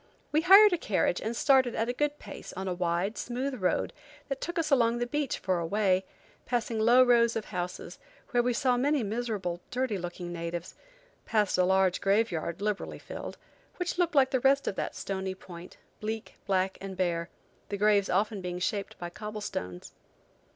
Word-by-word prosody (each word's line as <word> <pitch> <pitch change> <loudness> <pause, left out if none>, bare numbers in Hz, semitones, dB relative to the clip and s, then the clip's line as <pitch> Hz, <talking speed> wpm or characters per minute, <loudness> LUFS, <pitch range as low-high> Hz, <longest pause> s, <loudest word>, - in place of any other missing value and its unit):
We 310 - +3
hired 395 +3 +8
a 350 - 0
carriage 190 - 0
and 225 +2 -3
started 260 -4 +4
at 225 - 0
a 245 - -1
good 295 +2 -1
pace, - - -9
on 190 +1 -5
a 185 - 0
wide, 175 +4 -1
smooth 255 0 -3
road 180 - 0 0.4
that 275 -1 -3
took 345 - -4
us 320 -2 0
along 235 -3 +4
the 240 - 0
beach 290 +2 -1
for 185 -2 0
a 170 - -2
way, 190 -1 +2 0.4
passing 235 -2 -1
low 240 +4 +6
rows 235 -2 +4
of 220 - -2
houses, 180 0 -5 0.3
where 245 - +3
we 245 +1 +1
saw 245 +1 +2
many 280 +1 +2
miserable, 210 -5 -3
dirty 250 -5 -1
looking 175 0 -6
natives; 170 +1 -5 0.5
passed 210 -3 +2
a 185 - +3
large 190 -1 +2
graveyard, 195 -4 0
liberally 210 -1 -2
filled, - - -8 0.4
which 360 0 -2
looked 345 -3 +1
like 265 -2 +5
the 260 - +2
rest 275 +2 +3
of - - 0
that - - -4
stony 190 -1 -3
point, 175 -2 -11 0.2
bleak, 220 +1 -4
black 190 -1 0
and 195 -1 -6
bare, 170 -2 -1 0.4
the 200 - -2
graves 205 -1 +3
often 205 +2 0
being 180 -1 -4
shaped 200 +2 -2
by 175 0 -6
cobblestones. 205 - -6
210 Hz, 185 wpm, -29 LUFS, 185-245 Hz, 0.5 s, hired